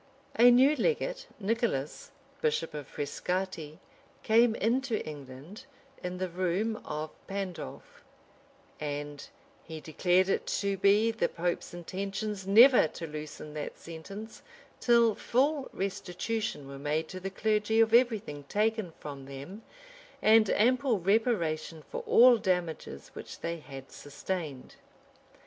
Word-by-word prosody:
A 240 +2 +8
new 260 +5 +6
legate, - - -1
Nicholas, 215 - -1 0.3
bishop 465 - 0
of 145 -3 -6
Frescati, 160 +1 -3 0.5
came 225 +1 +4
into 235 +1 0
England 145 - -9 0.4
in 180 0 -4
the 185 0 -2
room 185 +5 -1
of 155 +1 -5 0.2
Pandolf; 195 - -6 0.8
and 145 -1 -5 0.4
he 160 -1 -8
declared 180 +4 +2
it 195 - 0
to 200 -1 0
be 205 +4 +4
the 225 - 0
pope's 175 +1 -2
intentions 195 +3 -4
never 235 0 +7
to 165 - -7
loosen 150 -1 -8
that 150 -1 -5
sentence 195 +7 -9 0.4
till 235 -2 +4
full 275 +6 0
restitution 190 -3 -3
were 140 0 -8
made 150 +3 -1
to 185 - -6
the 190 +1 -4
clergy 215 +2 +1
of 225 0 +4
every 240 -1 +5
thing 150 -8 -8
taken 215 -4 0
from 140 -2 -8
them, 140 +10 -8 0.6
and 220 -1 +5
ample 250 0 +3
reparation 170 -6 0
for - - -3
all 245 0 +7
damages 175 - -2
which - - -9
they 170 0 -3
had 135 -3 -11
Sustained. 145 -2 -6
190 Hz, 125 wpm, -30 LUFS, 155-225 Hz, 0.8 s, A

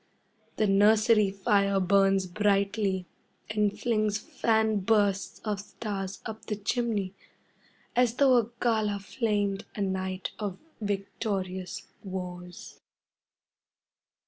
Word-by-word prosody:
The 215 - +2
nursery 210 +1 +5
fire 200 0 +2
burns 195 0 +3
brightly 200 0 +1 0.5
and 210 -1 +1
flings 215 -3 +1
fan 220 0 +1
bursts 200 -1 +1
of 210 -2 -1
stars 200 -2 -5
up 220 0 -6
the 210 - -2
chimney, 205 -2 -1 0.8
as 245 -1 +3
though 265 -2 +5
a 235 -2 +1
gala 215 -4 +1
flamed 205 -1 -1
a 205 - -3
night 190 -1 -2
of 200 -3 -3 0.2
victorious 195 -2 -3 0.2
wars. 180 -2 -7
205 Hz, 100 wpm, -28 LUFS, 195-215 Hz, 0.8 s, nursery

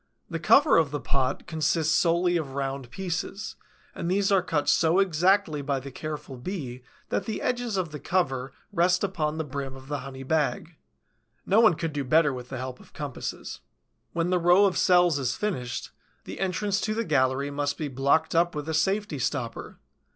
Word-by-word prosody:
The - - -2
cover 290 +1 +5
of 160 -3 +3
the 145 +1 -3
pot 135 -1 -1
consists 160 0 +1
solely 175 +1 +3
of 145 -5 -2
round 135 -2 -3
pieces, 190 - -4 0.4
and 170 - -4
these 195 +2 +2
are 195 -2 +5
cut 160 -5 -1
so 160 +3 +4
exactly 185 -3 +2
by 140 -1 -1
the 135 +1 -9
careful 150 -2 -6
Bee 130 -4 -5 0.3
that - - -1
the 220 - -3
edges 245 -4 -1
of 175 -4 -2
the 150 - -6
cover 135 -8 -1 0.2
rest 180 +1 +3
upon 160 -6 -1
the 160 - -1
brim 140 -2 -5
of 135 +1 -13
the 145 -1 -2
honey 135 0 -8
bag. 160 +4 -1 0.7
No 200 +3 +4
one 220 -7 +6
could 165 -1 -3
do 145 -1 -2
better 150 +2 +3
with 125 0 -8
the 130 - -5
help 130 0 -6
of - - -18
compasses. 145 -4 -6 0.5
When 170 +1 -1
the 180 - +3
row 175 +4 +5
of 190 - +1
cells 175 -5 +4
is 130 -2 -1
finished, 130 - -3 0.3
the - - -8
entrance 195 +2 0
to 215 0 -1
the 230 0 -1
gallery 140 -2 +1
must 145 0 -1
be 155 - -3
blocked 140 +4 +1
up 170 0 +2
with 150 0 -4
a 160 - -2
safety 190 -1 0
stopper. 125 -3 -3
160 Hz, 190 wpm, -27 LUFS, 140-180 Hz, 0.7 s, one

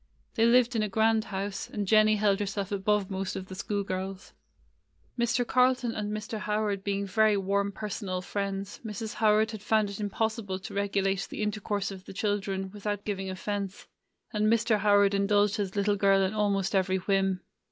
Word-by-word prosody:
They 230 0 +3
lived 245 0 +4
in 220 - +2
a 215 - -1
grand 220 +2 +2
house, 195 0 -4
and 205 -1 -3
Jennie 215 +1 +5
held 205 -1 +2
herself 200 -1 -3
above 200 0 0
most 190 0 -3
of 190 - -5
the - - -7
school 200 +2 -2
girls. 190 0 -5 0.8
Mr. 240 0 +1
Carlton 250 -1 +2
and 210 -1 -3
Mr. 215 +1 -4
Howard 210 -2 -1
being 200 0 -1
very 215 +1 +3
warm 200 +1 0
personal 195 -3 -4
friends, 195 0 -4
Mrs. 220 +1 -5
How 220 -1 +1
ard 220 +1 +2
had 215 -3 -7
found 210 -1 +1
it 200 - -7
impossible 210 -1 -2
to 190 - -9
regulate 195 -1 0
the - - -4
intercourse 205 -1 -2
of 190 -1 -10
the - - -9
children 195 -2 -2
without 205 0 -4
giving 195 -2 -3
offence, 195 +1 -4 0.5
and 210 0 +1
Mr. 225 -1 +3
Howard 205 -1 +4
indulged 205 +1 +2
his 200 -2 -3
little 205 0 +1
girl 195 -1 +4
in 190 +2 0
almost 200 -2 0
every 190 -1 +2
whim. 195 0 0
205 Hz, 185 wpm, -28 LUFS, 195-215 Hz, 0.8 s, Jennie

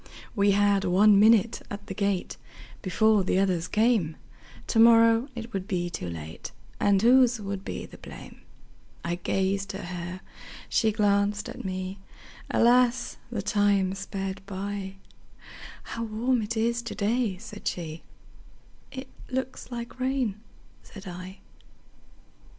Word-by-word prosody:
We 200 -1 +3
had 200 -1 +3
one 200 +2 +5
minute 220 +1 +5
at 205 0 -7
the - - -6
gate, 200 -2 -1 0.5
Before 215 +2 +3
the 185 - +1
others 185 -3 +1
came; 215 -8 +2 0.5
To 225 - +1
morrow 230 +1 +6
it 235 0 -7
would 190 -1 -3
be 175 -4 -1
too 90 - -4
late, 80 -1 -7 0.3
And 200 -1 +4
whose 245 +1 +5
would 200 -1 -5
be - - -5
the - - -14
blame!I 170 - -10
gazed 195 +2 -1
at 195 - -6
her, 180 +1 -6 0.5
she 220 - +2
glanced 205 0 +1
at - - -8
me; 185 +1 -4 0.5
Alas! 245 +1 +3
the 215 -5 -3
time 205 -2 +2
sped 195 0 -5
by:"How 195 +3 -8
warm 230 +3 0
it 220 +2 -3
is 235 +2 +1
to 235 - -6
day!" 215 -1 0
said 210 +1 -8
she;"It 175 - -9 0.2
looks 260 0 -4
like 235 +1 -6
rain," 255 -5 0 0.4
said 200 -1 -12
I. 185 +2 -8
205 Hz, 130 wpm, -27 LUFS, 190-230 Hz, 0.5 s, morrow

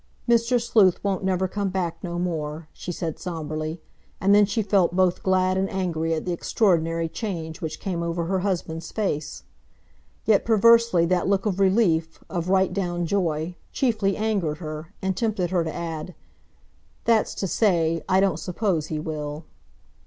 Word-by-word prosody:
"Mr. 235 +1 +3
Sleuth 210 -6 +4
won't 195 -1 -1
never 190 0 +1
come 200 +1 -2
back 175 -3 -3
no 175 -1 -4
more," 160 -3 -3
she 180 - -6
said 165 -2 -4
sombrely, 155 -1 -4 0.4
and 195 +1 +4
then 205 0 +6
she 215 +2 0
felt 190 -3 +2
both 185 -1 +2
glad 185 0 +2
and 195 - 0
angry 170 -4 -1
at 155 - -4
the 180 - -1
extraordinary 165 -3 +1
change 165 -3 -5
which 160 - -4
came 180 -4 -3
over 170 0 -2
her 190 +2 0
husband's 170 -4 -3
face. 155 -9 -3 0.8
Yet, 215 -2 +4
perversely, 230 -4 +5
that 180 +1 +1
look 195 +1 +1
of 200 -3 -1
relief, 185 -5 +2
of 175 -1 -2
right 190 -1 +3
down 175 -3 -1
joy, 165 -3 -1 0.2
chiefly 220 -7 +1
angered 200 -8 0
her, 155 -1 -7
and 190 -1 0
tempted 210 -6 -1
her 175 -2 +2
to 160 - -3
add, 165 0 -5 0.9
"That's 230 -2 +2
to - - -2
say, 165 -5 +2
I 185 - +4
don't 190 -5 +2
suppose 175 -2 -1
he 155 - -3
will." 150 0 -5
180 Hz, 165 wpm, -24 LUFS, 165-195 Hz, 0.9 s, then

